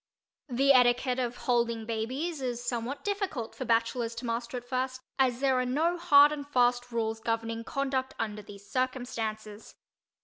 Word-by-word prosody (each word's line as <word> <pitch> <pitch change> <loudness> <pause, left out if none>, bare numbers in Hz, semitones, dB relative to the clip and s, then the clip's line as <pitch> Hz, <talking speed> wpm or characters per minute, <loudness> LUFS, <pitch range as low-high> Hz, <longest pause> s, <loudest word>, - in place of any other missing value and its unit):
The 270 +3 +4
etiquette 250 0 +3
of 245 -1 -2
holding 235 -2 +1
babies 260 +8 -3
is 245 -2 -3
somewhat 245 +3 -3
difficult 395 - -2
for 260 - -5
bachelors 230 0 +1
to 235 +2 -6
master 235 +1 -3
at 245 0 -9
first 255 0 -2 0.2
as 255 -1 +2
there 265 -2 +3
are - - +1
no 310 +8 +1
hard 295 -4 +6
and 285 -1 -5
fast 245 -2 +2
rules 225 -1 -1
governing 230 0 -2
conduct 265 0 -2
under 210 -1 -3
these 200 0 -13
circumstances. 225 -4 -3
245 Hz, 160 wpm, -29 LUFS, 230-265 Hz, 0.2 s, hard